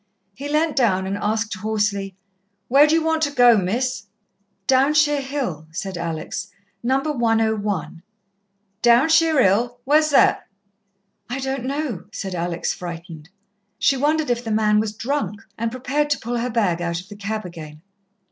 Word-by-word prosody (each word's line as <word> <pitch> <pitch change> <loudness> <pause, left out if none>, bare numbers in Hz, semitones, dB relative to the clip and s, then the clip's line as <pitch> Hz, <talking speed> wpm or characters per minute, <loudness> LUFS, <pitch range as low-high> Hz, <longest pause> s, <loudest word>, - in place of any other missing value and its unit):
He 280 +6 -7
leant 305 +1 +1
down 190 -8 +2
and 195 +1 -2
asked 215 +2 -1
hoarsely. 200 -1 -2 0.5
"Where 280 +4 +6
d'you 320 +1 +2
want 320 0 +1
to 290 -2 +1
go, 245 -4 +6
Miss?" 230 +7 -1 0.6
"Downshire 290 +2 +3
Hill," 260 - -4
said 185 +3 -5
Alex. 170 +4 -4 0.3
"No. 260 +3 +2
101." 220 - -1 0.8
"Downshire 315 +6 +4
'Ill? 240 +6 +1
Where's 305 +3 +4
that?" 285 - +3 0.8
"I 245 - -3
don't 265 -1 -3
know," 270 - -3
said 195 -2 -5
Alex, 175 -1 -2
frightened. 165 -3 -8 0.5
She 275 - +3
wondered 295 +1 +1
if 240 0 -1
the 225 - -5
man 215 -1 +3
was 215 0 -2
drunk, 225 -4 -3
and 230 +1 -2
prepared 265 +5 -1
to 290 - +1
pull 240 +1 -3
her 245 +2 -2
bag 200 -8 0
out 170 -1 -2
of 180 - -11
the 205 - -10
cab 215 +1 -4
again. 155 -3 -10
225 Hz, 150 wpm, -22 LUFS, 195-275 Hz, 0.8 s, Where